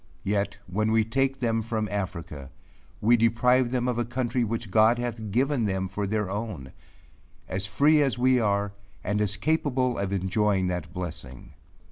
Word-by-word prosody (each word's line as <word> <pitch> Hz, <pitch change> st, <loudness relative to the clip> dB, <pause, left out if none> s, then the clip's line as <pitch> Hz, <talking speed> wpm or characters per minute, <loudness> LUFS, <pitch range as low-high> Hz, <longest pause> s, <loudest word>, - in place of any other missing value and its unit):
Yet 100 Hz, 0 st, -1 dB
when 110 Hz, +4 st, -1 dB
we 110 Hz, 0 st, +4 dB
take 135 Hz, +3 st, 0 dB
them 115 Hz, -3 st, 0 dB
from 110 Hz, -1 st, -2 dB
Africa, 85 Hz, -8 st, -5 dB, 0.5 s
we 115 Hz, +3 st, +5 dB
deprive 120 Hz, +2 st, +3 dB
them 125 Hz, 0 st, -1 dB
of 120 Hz, -1 st, -1 dB
a -, -, +2 dB
country 120 Hz, +1 st, -1 dB
which 115 Hz, -2 st, -3 dB
God 110 Hz, +3 st, +5 dB
hath 115 Hz, -3 st, -4 dB
given 130 Hz, +3 st, +1 dB
them 95 Hz, -1 st, -1 dB
for 100 Hz, +2 st, -3 dB
their 105 Hz, 0 st, -1 dB
own; 95 Hz, -, -5 dB, 0.8 s
as 95 Hz, +2 st, -2 dB
free 150 Hz, +7 st, +4 dB
as 135 Hz, -3 st, +1 dB
we 130 Hz, +1 st, +3 dB
are, 100 Hz, -2 st, 0 dB, 0.3 s
and 105 Hz, +2 st, 0 dB
as 105 Hz, 0 st, 0 dB
capable 130 Hz, -2 st, 0 dB
of 100 Hz, -1 st, -2 dB
enjoying 95 Hz, 0 st, +1 dB
that 90 Hz, -1 st, -4 dB
blessing. 85 Hz, -9 st, -7 dB
110 Hz, 165 wpm, -26 LUFS, 100-120 Hz, 0.8 s, we